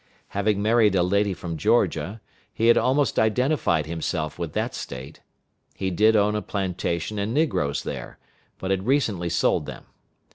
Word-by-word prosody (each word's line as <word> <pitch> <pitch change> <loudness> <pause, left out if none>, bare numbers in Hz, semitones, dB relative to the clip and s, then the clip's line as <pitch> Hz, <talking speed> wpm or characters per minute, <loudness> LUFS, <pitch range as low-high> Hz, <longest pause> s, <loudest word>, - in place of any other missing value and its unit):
Having 100 0 0
married 110 -2 +4
a 90 - +3
lady 100 +3 +1
from 85 -3 -5
Georgia, 100 +7 +1 0.3
he 115 +1 +2
had 120 - +7
almost 135 +1 +2
identified 110 - +1
himself 80 -1 -3
with 85 -3 -4
that - - -1
State. 65 +2 -8 0.5
He 95 -1 -2
did 110 +5 +4
own 105 0 +3
a 105 - -1
plantation 95 0 -3
and 105 +4 -2
negroes 75 - 0
there, - - -6 0.4
but 95 - -3
had 95 +2 -1
recently 110 -11 +1
sold 85 - +1
them. - - -8
100 Hz, 155 wpm, -24 LUFS, 85-110 Hz, 0.5 s, had